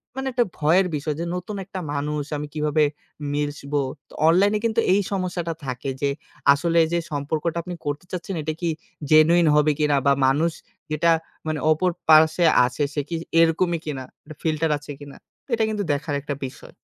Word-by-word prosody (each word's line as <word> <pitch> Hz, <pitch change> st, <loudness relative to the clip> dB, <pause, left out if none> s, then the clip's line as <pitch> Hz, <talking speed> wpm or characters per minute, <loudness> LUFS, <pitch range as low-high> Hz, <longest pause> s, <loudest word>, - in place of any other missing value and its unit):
মানে 265 Hz, 0 st, -3 dB
একটা 240 Hz, -1 st, +2 dB
ভয়ের 175 Hz, +5 st, +3 dB
বিষয় 150 Hz, +1 st, -2 dB
যে 170 Hz, -, -2 dB
নতুন 180 Hz, +3 st, -5 dB
একটা 190 Hz, -1 st, -6 dB
মানুষ 150 Hz, +1 st, -2 dB
আমি 150 Hz, 0 st, -5 dB
কীভাবে 150 Hz, 0 st, +1 dB, 0.5 s
মিশবো? 145 Hz, -1 st, -2 dB, 0.3 s
তো -, -, -17 dB
অনলাইনে 200 Hz, +5 st, +4 dB
কিন্তু 220 Hz, -, +1 dB
এই 205 Hz, -, +3 dB
সমস্যাটা 180 Hz, -3 st, -2 dB
থাকে 125 Hz, +1 st, -4 dB
যে 140 Hz, -, +2 dB, 0.4 s
আসলে 170 Hz, +3 st, +1 dB
যে 170 Hz, -, +2 dB
সম্পর্কটা 155 Hz, +3 st, -2 dB
আপনি 180 Hz, -1 st, -6 dB
করতে 145 Hz, +5 st, -3 dB
চাচ্ছেন, 180 Hz, +1 st, -4 dB
এটা 155 Hz, +1 st, -2 dB
কি 170 Hz, -, 0 dB, 0.4 s
জেনুইন 165 Hz, +2 st, +6 dB
হবে 150 Hz, 0 st, +4 dB
কিনা? 150 Hz, -1 st, +3 dB
বা 140 Hz, -, +5 dB
মানুষ 155 Hz, +5 st, +2 dB, 0.4 s
যেটা 165 Hz, +2 st, +3 dB, 0.4 s
মানে 155 Hz, -1 st, -1 dB
অপর 180 Hz, +4 st, +2 dB, 0.2 s
পার্স্বে 160 Hz, +2 st, +6 dB, 0.2 s
আছে 135 Hz, +4 st, -2 dB
সে 145 Hz, -, 0 dB
কি 170 Hz, -, -2 dB, 0.2 s
এরকমই 165 Hz, +1 st, +3 dB
কিনা? 140 Hz, -4 st, -4 dB, 0.2 s
একটা 155 Hz, 0 st, -12 dB
ফিল্টার 160 Hz, 0 st, +1 dB
আছে 145 Hz, 0 st, -10 dB
কিনা। 145 Hz, -1 st, -11 dB, 0.4 s
এটা 225 Hz, -1 st, +2 dB
কিন্তু 210 Hz, -2 st, -2 dB
দেখার 145 Hz, +1 st, -2 dB
একটা 145 Hz, 0 st, -4 dB
বিষয়। 130 Hz, -, -11 dB
155 Hz, 175 wpm, -23 LUFS, 145-175 Hz, 0.5 s, জেনুইন